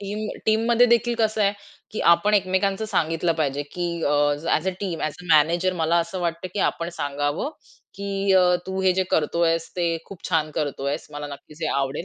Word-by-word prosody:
Team 210 +2 -4 0.2
टीममध्ये 230 +2 +4
देखील 235 0 +2
कसं 220 -1 +1
आहे, 200 0 +3 0.4
की 215 - -4
आपण 205 +5 +2
एकमेकांचं 195 +1 +1
सांगितलं 165 -4 0
पाहिजे, 145 -3 -1
की 175 +5 -4 0.2
अ, - - +1 0.4
as - - +1
a - - +2
team, 180 -5 -3
as 155 - -2
a - - -13
manager 170 +5 +3
मला 165 +2 +2
असं 170 +2 -2
वाटतं, 170 +1 -2
की 205 - -3
आपण 170 0 -5
सांगावं, 145 - -2 0.5
की 200 0 -1
अ, 190 - +7 0.3
"तू 190 0 -3
हे 185 -1 +4
जे 190 +1 +1
करतोयस 165 +1 +1
ते 170 -2 +1
खूप 195 - -12
छान 155 -3 +1
करतोयस. 145 0 -2
मला 145 0 -5
नक्कीच 145 +2 -11
हे 155 - +1
आवडेल. 135 +4 -1
170 Hz, 190 wpm, -24 LUFS, 155-200 Hz, 0.5 s, अ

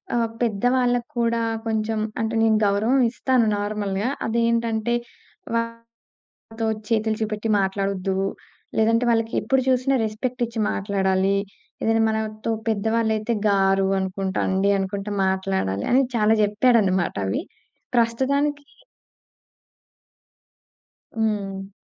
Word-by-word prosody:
ఆహ్, 230 -1 +1
పెద్ద 215 -3 -1
వాళ్ళక్కూడా 240 -2 0 0.3
కొంచెం 220 0 -1 0.2
అంటే 225 +1 -1
నేను 220 -1 +4
గౌరవం 220 +7 +2
ఇస్తాను 255 -2 +2
నార్మల్‌గా. 205 +1 -2 0.2
అదేంటంటే, 230 0 +1 0.6
వాళ్లతో 230 0 -5 0.9
చేతులు 220 -1 +1
చూపెట్టి 215 0 -2
మాట్లాడొద్దు, 195 -1 -1 0.6
లేదంటే 230 +2 +3
వాళ్ళకెప్పుడు 230 +3 +1
చూసినా 260 +1 +2
రెస్పెక్ట్ 240 +4 -4
ఇచ్చి 230 0 -6
మాట్లాడాలి. 195 -1 +1 0.5
ఏదైనా 225 0 +2
మనతో 220 0 -2 0.2
పెద్ద 220 -1 0
వాళ్ళయితే 220 0 0 0.2
గారు 195 -1 +3
అనుకుంటా, 190 0 -2
అండి 190 +1 +2
అనుకుంట 195 +1 -3 0.2
మాట్లాడాలి. 190 - -1
అని 260 +2 +5
చాలా 215 0 +4
చెప్పాడన్నమాట 205 -4 +2
అవి. 95 - -1 0.5
ప్రస్తుతానికి 280 +5 +1 2.5
హ్మ్. 200 -3 -2
220 Hz, 95 wpm, -23 LUFS, 195-230 Hz, 2.5 s, అని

